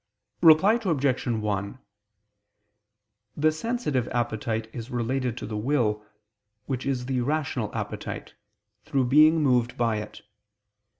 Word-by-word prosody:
Reply 180 +8 +6
Obj. 140 - 0
1: 105 0 -2 1.6
The 155 +1 +3
sensitive 155 - -2
appetite 110 -2 -2
is 120 0 -7
related 125 0 -2
to - - -5
the 110 - -5
will, 105 -2 0 0.6
which 130 -1 -3
is 130 -3 -1
the 130 -1 -1
rational 135 -4 -1
appetite, - - -5 0.5
through 140 -4 0
being 155 +4 +5
moved 125 -2 +2
by 115 -2 +1
it. 105 0 -8
125 Hz, 115 wpm, -26 LUFS, 115-150 Hz, 1.6 s, Reply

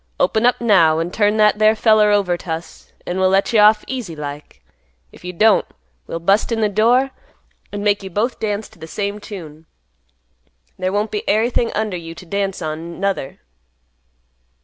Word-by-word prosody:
Open 220 +2 +2
up, 245 - +1
now, 185 -9 +4
an' 165 +2 -3
turn 210 +1 +1
that 210 0 +3
there 215 +1 +4
feller 215 -1 +4
over 200 -4 +2
t' 175 - -11
us; 160 +1 -7
an' 180 +1 -3
we'll 190 0 +3
let 195 +4 +1
you 220 - +4
off 210 +1 +5
easy 240 -11 -5
like. 145 - -8 0.5
If - - -17
you 180 - -5
don't, 210 +4 +4 0.4
we'll - - -4
bust 195 +7 +1
in 230 - 0
th' 205 - -8
door, 245 +6 +3 0.6
an' 205 0 -5
make 205 -1 +2
you 190 - -7
both 215 +7 -2
dance 210 -1 -2
t' - - -22
th' 160 - -10
same 205 +2 -3
tune. 160 -7 -10 1.1
There 185 0 -1
won't 205 +2 -1
be 210 - -2
ary 220 +4 +2
thing 235 -1 0
under 210 -4 -2
you 165 -1 -9
t' 180 - -12
dance 195 +1 -3
on, 160 +3 -6
nuther." 195 -8 -3
200 Hz, 190 wpm, -19 LUFS, 175-215 Hz, 1.1 s, off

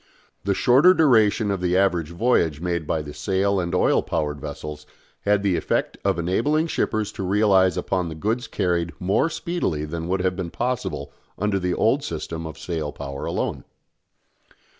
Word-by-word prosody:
The 100 -1 +1
shorter 140 - +5
duration 110 - +4
of 95 -2 -2
the 90 0 +2
average 90 -5 +2
voyage 85 - +1
made 85 -2 -2
by 80 -2 -1
the 75 -1 -8
sail 100 +2 0
and 85 -1 -2
oil - - +3
power 75 -2 -1
vessels 75 +1 -7 0.4
had 100 0 +3
the 95 -3 +2
effect - - -1
of 100 -3 +1
enabling 115 - +1
shippers 110 -7 -1
to 110 - -7
realise 95 -2 +3
upon 90 -3 -1
the 80 - -6
goods 110 +9 -1
carried 85 -3 -1
more 95 - +2
speedily 165 - -2
than 80 +2 -5
would 95 +1 0
have 90 0 0
been 90 -2 -4
possible 110 - -3 0.2
under 105 0 0
the 90 -1 -1
old 130 +6 +2
system 80 - -5
of 80 -1 -9
sail 80 -3 -3
power 70 -1 -6
alone. - - -2
95 Hz, 170 wpm, -23 LUFS, 80-105 Hz, 0.4 s, shorter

